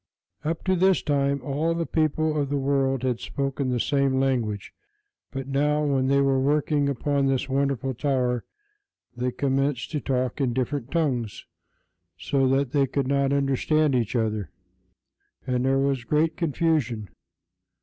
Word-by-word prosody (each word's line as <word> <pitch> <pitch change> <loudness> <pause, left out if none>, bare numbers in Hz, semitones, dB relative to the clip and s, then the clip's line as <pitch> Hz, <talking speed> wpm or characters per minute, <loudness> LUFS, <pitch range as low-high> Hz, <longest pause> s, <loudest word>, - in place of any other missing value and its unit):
Up 160 +2 -2
to 185 0 +2
this 185 0 +3
time 140 -1 0
all 155 +4 0
the 170 0 -1
people 155 -1 0
of 145 -2 0
the 145 - 0
world 135 -1 +1
had 125 -3 0
spoken 135 -1 -2
the 125 -1 0
same 140 0 +1
language; 120 -7 -1 0.6
but 135 -1 -6
now, 150 +2 +1
when 135 -2 +1
they 140 +1 +3
were 135 -1 +2
working 145 +1 +1
upon 140 +1 0
this 135 0 0
wonderful 135 -1 0
tower, 125 -2 0 0.7
they 125 +1 -1
commenced 135 0 -1
to 150 - -1
talk 130 0 -1
in 125 -3 +1
different 130 0 -2
tongues 130 -10 -1 0.7
so 135 +9 +1
that 135 0 +1
they 140 -1 +2
could 135 +1 -1
not 140 0 +1
understand 140 +2 +2
each 120 -2 0
other, 110 -6 -1 1.0
and 125 0 0
there 135 0 +3
was 135 -2 0
great 155 +5 +1
confusion. 150 - 0
135 Hz, 150 wpm, -25 LUFS, 130-145 Hz, 1.0 s, this